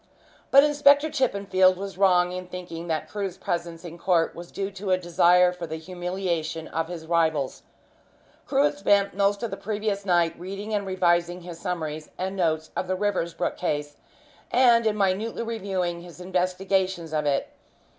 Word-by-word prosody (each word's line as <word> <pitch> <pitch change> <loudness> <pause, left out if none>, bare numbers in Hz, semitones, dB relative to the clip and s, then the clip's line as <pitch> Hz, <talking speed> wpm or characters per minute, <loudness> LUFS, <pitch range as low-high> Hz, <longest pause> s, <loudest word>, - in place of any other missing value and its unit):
But 275 +1 +8
Inspector 290 0 +5
Chippenfield 200 -9 +3
was 195 0 -6
wrong 180 -2 +4
in 180 0 -6
thinking 175 -2 -7
that 160 -2 -2
Crewe's 195 -3 -4
presence 170 -2 -4
in 170 0 -9
court 170 -3 +2
was 170 0 -9
due 195 0 -3
to 195 0 -6
a 185 - +4
desire 180 0 +4
for 175 -2 -6
the 160 - -4
humiliation 175 -1 -3
of 165 0 -2
his 170 -2 -7
rivals. 160 -4 0 0.9
Crewe 275 0 +3
had 295 0 +1
spent 200 -5 +3
most 200 +2 +1
of 235 - -2
the 195 - -4
previous 205 -1 -2
night 175 -3 +2
reading 195 +4 -6
and 200 -2 -1
revising 175 -1 +1
his 170 -1 -9
summaries 155 -4 -4
and 190 +1 -3
notes 160 -4 0
of 185 - -2
the 185 - 0
Riversbrook 190 -4 -1
case, 145 -4 -2 0.5
and 240 -3 +5
in 210 -1 0
minutely 205 +4 0
reviewing 190 -6 -2
his 175 0 -12
investigations 185 -1 -1
of 150 -1 0
it. 140 -1 0
180 Hz, 165 wpm, -25 LUFS, 170-200 Hz, 0.9 s, But